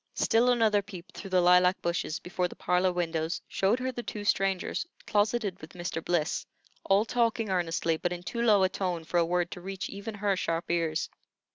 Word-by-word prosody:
Still 235 Hz, +2 st, +3 dB
another 220 Hz, -4 st, +3 dB
peep 190 Hz, -3 st, -11 dB
through 195 Hz, -, -8 dB
the 185 Hz, -1 st, +3 dB
lilac 180 Hz, +1 st, +5 dB
bushes 170 Hz, -2 st, -2 dB
before 180 Hz, 0 st, -2 dB
the -, -, -12 dB
parlor 180 Hz, +1 st, +1 dB
windows 165 Hz, -2 st, -1 dB
showed 195 Hz, +5 st, +1 dB
her 255 Hz, 0 st, -2 dB
the 240 Hz, -, -5 dB
two 210 Hz, -3 st, -6 dB
strangers 195 Hz, -2 st, 0 dB, 0.2 s
closeted 210 Hz, -2 st, 0 dB
with 155 Hz, -, -11 dB
Mr. 175 Hz, -2 st, -4 dB
Bliss, 175 Hz, -1 st, 0 dB, 0.4 s
all 200 Hz, +3 st, +3 dB
talking 230 Hz, -3 st, 0 dB
earnestly, 165 Hz, -2 st, 0 dB
but 175 Hz, -, -2 dB
in 175 Hz, 0 st, -5 dB
too 235 Hz, +6 st, -3 dB
low 210 Hz, -4 st, +5 dB
a 185 Hz, -, +3 dB
tone 180 Hz, -3 st, -2 dB
for 170 Hz, +2 st, -2 dB
a 170 Hz, -, +3 dB
word 175 Hz, 0 st, 0 dB
to 180 Hz, -, -7 dB
reach 190 Hz, +1 st, -5 dB
even 205 Hz, +2 st, -6 dB
her 200 Hz, -1 st, +1 dB
sharp 165 Hz, -2 st, -2 dB
ears. 165 Hz, -2 st, 0 dB
185 Hz, 200 wpm, -29 LUFS, 175-205 Hz, 0.4 s, lilac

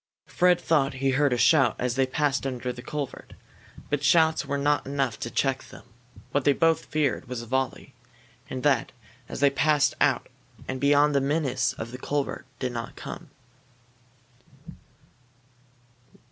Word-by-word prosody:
Fred 180 Hz, -1 st, +3 dB
thought 140 Hz, -4 st, +1 dB
he 135 Hz, +1 st, 0 dB
heard 145 Hz, +1 st, +2 dB
a 125 Hz, -, +1 dB
shout 135 Hz, -3 st, +4 dB
as 125 Hz, -1 st, -1 dB
they 135 Hz, +1 st, +1 dB
passed 140 Hz, 0 st, 0 dB
under 125 Hz, -1 st, -4 dB
the 125 Hz, -, -9 dB
culvert. 140 Hz, +2 st, -6 dB, 0.6 s
But 145 Hz, -1 st, 0 dB
shouts 160 Hz, +3 st, +4 dB
were 140 Hz, -, -1 dB
not 145 Hz, 0 st, +1 dB
enough 135 Hz, -4 st, -1 dB
to 120 Hz, -, -4 dB
check 135 Hz, +1 st, -1 dB
them. -, -, -13 dB, 0.5 s
What 145 Hz, -, +1 dB
they 145 Hz, -, +4 dB
both 165 Hz, +2 st, +2 dB
feared 150 Hz, -3 st, -1 dB
was 120 Hz, -1 st, -5 dB
a -, -, -9 dB
volley. 130 Hz, +2 st, -2 dB, 0.6 s
And 130 Hz, -1 st, -5 dB
that, 140 Hz, -5 st, +2 dB, 0.4 s
as -, -, -6 dB
they 140 Hz, -1 st, +5 dB
passed 150 Hz, +1 st, +2 dB
out 140 Hz, -4 st, +2 dB, 0.4 s
and 130 Hz, -1 st, -4 dB
beyond 145 Hz, +1 st, +4 dB
the 140 Hz, -, +2 dB
menace 135 Hz, -3 st, 0 dB
of 115 Hz, +1 st, -7 dB
the 125 Hz, -, -8 dB
culvert, 145 Hz, +1 st, -3 dB
did 130 Hz, -1 st, -3 dB
not 115 Hz, -1 st, -6 dB
come. -, -, -8 dB
135 Hz, 160 wpm, -26 LUFS, 130-145 Hz, 0.6 s, they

